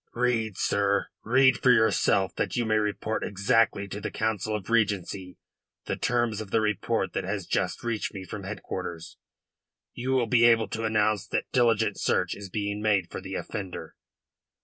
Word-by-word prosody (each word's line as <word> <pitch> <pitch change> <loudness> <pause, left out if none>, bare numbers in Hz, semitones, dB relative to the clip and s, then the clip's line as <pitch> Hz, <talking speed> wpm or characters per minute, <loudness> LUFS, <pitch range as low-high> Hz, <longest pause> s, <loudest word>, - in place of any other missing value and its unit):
"Read, 115 -4 0
sir 100 0 +1
read 130 +3 +4
for 125 - +3
yourself, 110 -5 +3
that - - -2
you 120 -2 0
may 110 -1 +2
report 105 +1 -2
exactly 100 +1 +1
to 100 +2 -6
the - - -3
Council 110 -1 -1
of 100 -3 -5
Regency 100 -4 0 0.5
the - - -2
terms 120 -3 0
of 105 - -8
the - - +2
report 105 -2 -1
that - - -2
has 100 0 -3
just 90 0 -1
reached 115 -3 -2
me 95 -3 -7
from 100 +3 -7
headquarters. 90 -4 -6 0.8
You 125 +2 -5
will 130 -2 +3
be 120 +1 +4
able 115 -1 +4
to 115 0 -3
announce 105 -2 +1
that - - -2
diligent 115 -4 +2
search 90 -1 +1
is 100 -2 -8
being 100 +1 -3
made 100 -5 +1
for - - -5
the 95 0 -6
offender." 95 -4 -6
105 Hz, 170 wpm, -27 LUFS, 100-115 Hz, 0.8 s, read